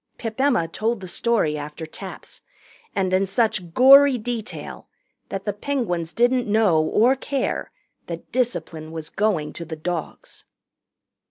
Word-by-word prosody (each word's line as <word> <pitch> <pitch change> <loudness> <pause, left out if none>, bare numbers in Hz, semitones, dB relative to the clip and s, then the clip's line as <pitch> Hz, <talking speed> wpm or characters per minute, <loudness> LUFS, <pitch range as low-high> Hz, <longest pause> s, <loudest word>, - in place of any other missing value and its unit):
Pip 225 +2 -4
Emma 250 -12 +2
told 220 +6 -1
the 190 - -8
story 180 -7 0
after 150 +2 -7
taps 190 +4 -9 0.5
and 185 -1 0
in 190 +1 +2
such 195 -4 0
gory 275 +1 +8
detail 235 -1 -6 0.4
that 195 0 -5
the 205 - -1
Penguins 205 - -2
didn't 245 +2 +2
know 205 -7 +3
or 235 +10 +3
care 270 0 -2 0.4
that 170 -1 -7
discipline 175 -11 -2
was 160 -1 -7
going 190 -8 0
to 170 - -6
the 165 -1 -6
dogs. 165 0 -5
205 Hz, 140 wpm, -23 LUFS, 165-240 Hz, 0.5 s, gory